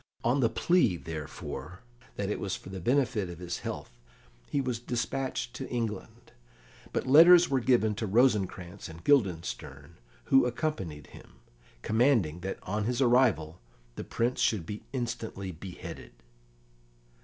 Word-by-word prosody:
On 125 +4 +2
the 115 -4 +3
plea, 115 - +2
therefore, 80 +5 -7 0.3
that 100 0 -2
it - - -2
was 95 -1 -2
for - - -11
the 95 0 -6
benefit 115 -3 +1
of 85 - -8
his 90 0 -5
health, - - -6 0.6
he 145 - 0
was 125 -4 -2
despatched 120 0 -3
to 135 - -6
England, 115 -5 -5 0.6
but - - -2
letters 170 +4 +8
were 135 - +3
given 115 -3 +3
to 110 +1 -3
Rosencrantz 95 -7 +1
and 80 +1 -11
Guildenstern, 100 - 0 0.3
who 135 - +4
accompanied 95 - -3
him, - - -15 0.5
commanding 110 - +2
that 95 +2 -4
on 105 +2 -2
his 125 +1 -1
arrival 120 - +3 0.4
the - - -5
Prince 120 +2 -1
should 100 -7 +1
be 105 +4 -6
instantly 115 -6 -4
beheaded. 90 +2 -9
110 Hz, 140 wpm, -29 LUFS, 90-125 Hz, 0.6 s, letters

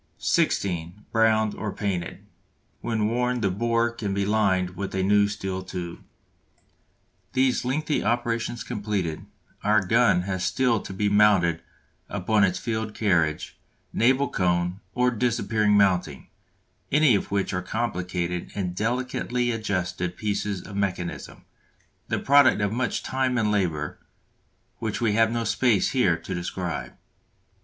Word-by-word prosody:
(16) 90 +1 0
Browned 110 -1 +3
or 105 - -4
painted. 95 -5 -4 0.5
When 110 -2 -1
worn 125 +1 0
the 100 -3 +1
bore 115 +3 +1
can 105 -4 -4
be 100 0 0
lined 95 -4 +1
with 95 +1 -5
a 95 - 0
new 100 +1 +4
steel 95 -2 -4
tube. 90 -2 -6 1.3
These 130 -1 +2
lengthy 150 +4 -1
operations 115 0 -1
completed, 100 -7 -3 0.4
our 105 -1 +3
gun 115 -3 +3
has 95 -1 -3
still 125 -4 +2
to - - -8
be 105 +2 -1
mounted 100 -5 +4 0.5
upon 105 +2 +1
its 95 -2 +2
field 110 -2 -3
carriage, 85 -7 0 0.3
naval 130 +4 +3
cone, 90 0 0 0.2
or 125 0 +3
disappearing 110 -3 +1
mounting, 90 -8 +1 0.6
any 150 -3 +5
of 100 - 0
which 100 -1 -1
are 90 - -1
complicated 90 -4 -3
and 95 -3 -2
delicately 120 +2 -1
adjusted 90 -5 -2
pieces 105 -2 -2
of 100 - -9
mechanism, 95 -3 -3 0.6
the - - -1
product 140 -4 +5
of 100 0 0
much 125 +2 -1
time 130 -1 0
and 110 -2 +1
labour, 85 -7 -1 0.8
which 110 -2 -3
we 115 -3 +1
have 115 +1 +3
no 115 0 -1
space 115 -1 +2
here 100 -11 +2
to 95 - -7
describe. 90 -3 -4
105 Hz, 135 wpm, -25 LUFS, 90-115 Hz, 1.3 s, any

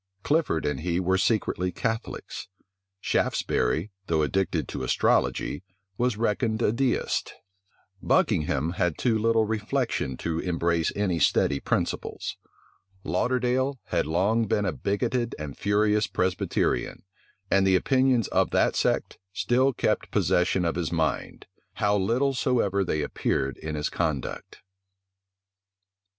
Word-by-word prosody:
Clifford 145 - +1
and 75 -2 -1
he 85 +2 -1
were 95 +1 +1
secretly 95 -4 0
Catholics: 115 +6 -4 0.5
Shaftesbury, 80 - 0 0.2
though 80 -2 +2
addicted 95 +5 0
to - - -5
astrology, 65 +3 +1 0.3
was 120 0 0
reckoned 110 0 0
a - - +3
deist: 125 +2 -1 0.7
Buckingham 75 +1 +1
had 90 -3 -1
too 120 -3 +1
little 115 0 +3
reflection 110 - -1
to 80 -1 -2
embrace 85 -2 0
any 95 -5 0
steady 70 -1 +2
principles: - - -2 0.7
Lauderdale 130 +2 0
had - - 0
long 100 +8 +2
been 105 +1 +1
a 95 - +1
bigoted 115 - -1
and 75 -3 -6
furious 105 +1 +2
Presbyterian; 90 -10 -1 0.5
and 95 0 +4
the 95 - +4
opinions 130 +2 +2
of - - +2
that - - +2
sect - - 0
still 125 +6 +2
kept - - -1
possession 90 0 +2
of 85 - +1
his 85 -2 -2
mind, 80 -2 -2 0.3
how 105 0 +1
little 120 +8 +1
soever 110 -7 +1
they 75 -4 -1
appeared 70 -2 -1
in 80 -1 -5
his 75 0 -1
conduct. 75 -6 -3
100 Hz, 125 wpm, -26 LUFS, 85-115 Hz, 0.7 s, and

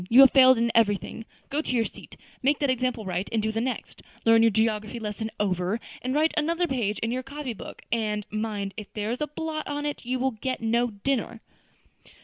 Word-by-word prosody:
You 245 +4 +9
have 270 - +9
failed 260 -2 +7
in 235 0 +2
everything. 225 0 +1 0.3
Go 290 +2 +1
to - - -4
your 230 -2 +2
seat. - - -10 0.2
Make 280 +2 +3
that 285 -3 +1
example 250 -3 -1
right, 185 +1 -2
and 225 - +1
do 220 +1 0
the 225 +1 -1
next; 255 +1 -4 0.2
learn 225 0 +6
your 230 - +6
geography 220 +1 0
lesson 220 0 -4
over, 190 +1 0 0.2
and 255 +2 -2
write 315 +2 +3
another 335 +3 +1
page 235 -9 -1
in 225 - 0
your 255 +1 -1
copy 270 -1 -5
book; - - -10
and, 210 -3 0
mind, 210 -2 -3
if 210 -2 -7
there 210 +1 -2
is 245 - -3
a 300 - 0
blot 310 +1 -4
on 290 0 -3
it, 295 - -3
you 250 +1 -1
will 260 +1 +1
get 255 +3 -3
no 235 +2 +1
dinner." 230 +2 -2
230 Hz, 215 wpm, -26 LUFS, 215-265 Hz, 0.3 s, You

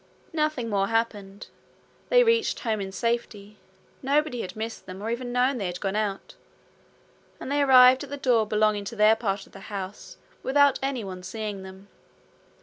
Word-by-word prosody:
Nothing 305 -6 -1
more 200 -2 0
happened. 210 -3 -2 0.6
They - - +6
reached 460 -1 +1
home 220 -4 -1
in 190 -1 -5
safety. 210 -2 -3 0.4
Nobody 280 -2 0
had 185 - -7
missed 225 -1 -6
them, 185 0 -8
or 220 +3 -3
even 245 +1 -4
known 250 +1 +1
they 195 - -2
had 175 0 -5
gone 195 0 -2
out; 210 -2 -3 1.1
and 265 - -6
they 290 0 +2
arrived 255 -1 +7
at 285 - -9
the 285 - -5
door 240 -5 +2
belonging 210 -1 +1
to 215 - -6
their 215 +1 +5
part 200 -3 -3
of - - -21
the 195 - -12
house 195 -1 -7 0.2
without 285 0 +3
anyone 225 -9 -4
seeing 205 +1 -5
them. 190 +1 -12
220 Hz, 170 wpm, -26 LUFS, 200-260 Hz, 1.1 s, arrived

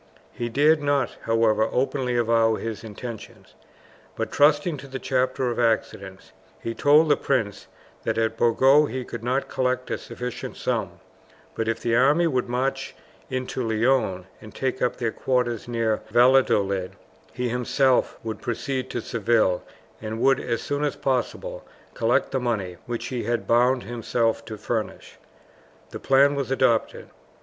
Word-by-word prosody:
He 120 0 -4
dared 150 +5 +3
not, 145 -3 0
however, 115 -1 +2
openly 130 -1 0
avow 115 -1 +3
his 115 0 -5
intentions; 110 - -9 0.6
but, 110 -1 -3
trusting 145 +2 +3
to 140 - -10
the 135 0 -5
chapter 130 -1 0
of 120 - -4
accidents, 100 -4 -1 0.3
he 115 - -4
told 150 +5 +5
the 145 - +4
prince 110 -10 -2 0.3
that - - -2
at 115 0 0
Burgos 135 +6 +4
he 130 -1 -4
could 115 -1 -7
not 130 +3 0
collect 130 0 -1
a - - -2
sufficient 125 0 -6
sum; - - -2 0.5
but 115 - -3
if 115 0 -1
the 115 -1 +1
army 145 +7 +4
would 130 -7 0
march 135 +2 -2 0.3
into 130 -1 -3
Leon 110 -4 +1 0.2
and 110 - -12
take 130 -1 -2
up 125 - +1
their 115 -2 -2
quarters 125 -3 -1
near 115 -2 0
Valladolid, 110 -6 +3 0.4
he 125 +1 -2
himself 125 +2 +1
would 110 -1 -5
proceed 130 +2 -3
to 120 - -3
Seville, 110 -5 +1 0.4
and 110 +1 -5
would 135 +1 +3
as 115 -2 -3
soon 145 +1 -2
as 145 - 0
possible - - -2 0.3
collect - - +1
the 135 - 0
money 105 -8 -2
which 120 -1 -4
he 125 -4 -3
had 120 0 -1
bound 125 +2 +3
himself 115 -1 -1
to 110 -1 -7
furnish. 110 +1 -4 0.7
The - - -6
plan 140 +1 +4
was 140 -3 -3
adopted. 130 -4 +1
120 Hz, 155 wpm, -24 LUFS, 115-135 Hz, 0.7 s, told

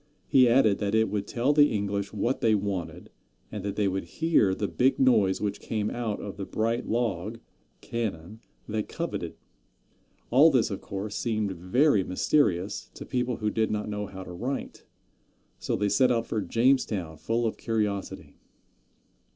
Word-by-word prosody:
He 130 -2 +5
added 115 -5 +4
that 105 0 0
it 110 0 +3
would 105 -1 -2
tell 125 +5 +1
the 145 0 +5
English 100 -1 -2
what 115 +5 -1
they 110 -1 +4
wanted, 90 -5 -4 0.4
and 105 - -5
that 100 0 -3
they 105 -1 +1
would 95 0 -2
hear 160 - +2
the 100 - -2
big 125 +10 +2
noise 110 -8 +3
which 100 -1 -2
came 105 -2 -2
out 115 -4 -3
of 100 -1 -7
the 100 - -4
bright 115 +2 -1
log 110 -2 -1 0.4
(cannon) 110 -3 -4 0.3
they 110 0 -1
coveted. - - -5 1.0
All 140 +7 +7
this, 130 -7 +2
of 100 - -4
course, 100 +1 -5
seemed 110 -4 -1
very 95 - +2
mysterious 95 - 0
to - - -8
people 125 -1 -1
who 105 -1 -2
did 110 0 0
not 105 0 -2
know 105 -1 -3
how 95 -1 -8
to 90 - -10
write, 130 +10 -5 0.7
so - - -1
they 105 - 0
set 125 +5 +3
out 115 -1 +1
for 110 -2 -2
Jamestown 105 -5 +1
full 115 +7 -1
of 110 - -2
curiosity. 105 -3 -3
105 Hz, 165 wpm, -27 LUFS, 100-120 Hz, 1.0 s, All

